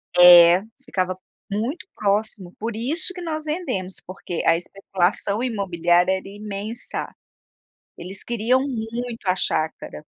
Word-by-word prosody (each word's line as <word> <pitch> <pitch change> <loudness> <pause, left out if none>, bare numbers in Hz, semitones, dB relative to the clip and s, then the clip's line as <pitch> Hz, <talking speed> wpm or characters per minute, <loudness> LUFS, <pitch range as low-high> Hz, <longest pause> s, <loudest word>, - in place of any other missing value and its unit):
É 175 0 +9 0.2
ficava 185 -1 -1 0.3
muito 230 - -3
próximo, 200 -3 -1
por 225 0 -3
isso 300 +11 -2
que 360 - -8
nós 310 -2 -4
vendemos 250 - -3
porque 180 -2 -5
a 165 - +5
especulação 195 +3 -1
imobiliária 180 -6 +2
era 190 +1 -4
imensa. 210 +3 -5 0.9
Eles 185 +3 -7
queriam 240 +2 +1
muito 235 -2 -5
a 185 0 +2
chácara. 155 - -2
200 Hz, 120 wpm, -23 LUFS, 180-235 Hz, 0.9 s, É